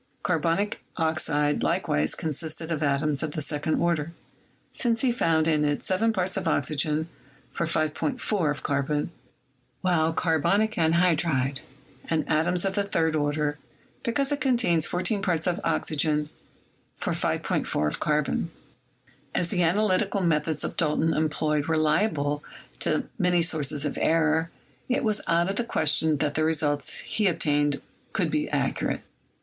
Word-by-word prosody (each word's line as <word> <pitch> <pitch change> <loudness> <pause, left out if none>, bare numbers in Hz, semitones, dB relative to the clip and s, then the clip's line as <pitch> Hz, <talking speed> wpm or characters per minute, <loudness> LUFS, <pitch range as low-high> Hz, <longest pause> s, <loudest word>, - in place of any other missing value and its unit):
Carbonic 170 +4 0
oxide 150 -2 +1
likewise 75 +1 +1
consisted 160 +1 -4
of 155 - -1
atoms 145 0 +1
of 155 -2 -3
the - - -3
second 150 +1 -1
order, 170 -2 0 0.6
since 230 -2 +1
he 260 - +3
found 165 -9 +2
in 155 -2 +2
it 145 -1 0
7 210 +5 +1
parts 185 -3 -1
of - - -2
oxygen 155 +1 +1 0.4
for 170 - -2
5.4 155 +3 0
of 145 - -3
carbon, 145 +2 -1 0.7
while 165 -3 +2
carbonic 180 +6 +2
anhydride 160 - +2 0.5
had 160 -2 0
atoms 175 +4 +1
of 195 - 0
the 200 - +1
third 165 -5 0
order, 145 0 0 0.4
because 270 +3 0
it 285 - -1
contains 235 - +2
14 185 +3 0
parts 175 -5 0
of 180 0 0
oxygen 150 -1 +1 0.7
for - - -2
5.4 75 - -1
of - - -3
carbon. 150 +2 0 0.9
As 175 - 0
the 180 -4 0
analytical 195 +3 +2
methods 160 -2 0
Dalton 160 0 +2
employed 150 -1 0
were 160 -1 +1
liable 150 -2 +1 0.4
to - - 0
many 180 -2 +3
sources 150 -3 +1
of 145 - -2
error, 160 0 +2 0.4
it 255 - +1
was 215 -2 +1
out 170 +1 +3
of 195 +1 -2
the 240 - +1
question 160 -7 +1
that 145 +1 0
the 155 - +1
results 145 -3 0
he 210 -2 0
obtained 145 -4 +1 0.3
could - - 0
be - - 0
accurate. - - -1
160 Hz, 145 wpm, -26 LUFS, 150-180 Hz, 0.9 s, he